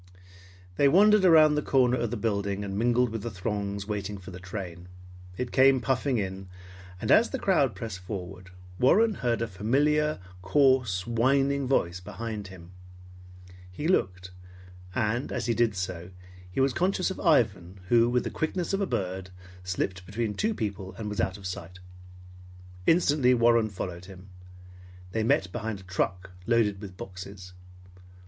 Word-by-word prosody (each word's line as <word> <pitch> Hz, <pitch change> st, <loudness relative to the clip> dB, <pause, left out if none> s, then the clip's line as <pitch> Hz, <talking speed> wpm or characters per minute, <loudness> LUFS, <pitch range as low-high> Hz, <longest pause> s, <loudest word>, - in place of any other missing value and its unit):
They 140 Hz, -, +5 dB
wandered 205 Hz, +6 st, +5 dB
around 160 Hz, -4 st, +7 dB
the 150 Hz, -, +1 dB
corner 125 Hz, -3 st, +2 dB
of 120 Hz, -1 st, -1 dB
the 120 Hz, -, -3 dB
building 100 Hz, -2 st, -1 dB
and 100 Hz, -1 st, -5 dB
mingled 120 Hz, +3 st, +2 dB
with 110 Hz, -1 st, -5 dB
the 120 Hz, -, -4 dB
throngs 100 Hz, 0 st, -3 dB
waiting 105 Hz, -1 st, -4 dB
for 95 Hz, -1 st, -11 dB
the 90 Hz, -, -9 dB
train. 90 Hz, -2 st, -7 dB, 0.5 s
It 125 Hz, -1 st, -3 dB
came 135 Hz, 0 st, +5 dB
puffing 130 Hz, 0 st, 0 dB
in, 95 Hz, -2 st, -4 dB, 0.5 s
and -, -, -1 dB
as 230 Hz, -, +6 dB
the 265 Hz, -, -3 dB
crowd 150 Hz, -, +2 dB
pressed 110 Hz, -5 st, -6 dB
forward, 90 Hz, 0 st, -7 dB, 0.3 s
Warren 215 Hz, -, +4 dB
heard 120 Hz, -, -1 dB
a -, -, -2 dB
familiar, 145 Hz, +10 st, +1 dB, 0.2 s
coarse, 120 Hz, -3 st, +2 dB
whining 135 Hz, +4 st, +1 dB
voice 95 Hz, -9 st, +1 dB
behind 105 Hz, +2 st, -6 dB
him. 90 Hz, -2 st, -13 dB, 1.0 s
He 120 Hz, -, -4 dB
looked; 90 Hz, -, 0 dB, 0.6 s
and 120 Hz, +2 st, -1 dB
as -, -, -2 dB
he 120 Hz, -, +1 dB
did 115 Hz, -3 st, +1 dB
so, 90 Hz, -1 st, -4 dB, 0.4 s
he 90 Hz, -, -4 dB
was 135 Hz, -1 st, +3 dB
conscious 185 Hz, +1 st, 0 dB
of -, -, -7 dB
Ivan 100 Hz, -, +1 dB
who, 120 Hz, 0 st, +5 dB
with 125 Hz, 0 st, +1 dB
the -, -, -4 dB
quickness 175 Hz, +4 st, -2 dB
of 195 Hz, -, 0 dB
a 195 Hz, -, 0 dB
bird, 95 Hz, 0 st, -3 dB, 0.3 s
slipped 95 Hz, 0 st, -3 dB
between 110 Hz, +1 st, -2 dB
two 215 Hz, -, -1 dB
people, 100 Hz, -3 st, -4 dB
and 110 Hz, -2 st, -4 dB
was 105 Hz, -2 st, -2 dB
out 95 Hz, +1 st, -1 dB
of 100 Hz, -, -13 dB
sight. 90 Hz, -1 st, -6 dB, 1.1 s
Instantly 145 Hz, -6 st, +4 dB
Warren 115 Hz, -2 st, +3 dB
followed 90 Hz, -2 st, -6 dB
him. 95 Hz, 0 st, -13 dB, 0.8 s
They 110 Hz, -, -1 dB
met 95 Hz, -4 st, +1 dB
behind 110 Hz, -2 st, -4 dB
a -, -, -14 dB
truck 90 Hz, 0 st, -2 dB, 0.2 s
loaded 110 Hz, -4 st, +2 dB
with 95 Hz, -3 st, -9 dB
boxes. 95 Hz, 0 st, -9 dB
110 Hz, 160 wpm, -27 LUFS, 95-130 Hz, 1.1 s, around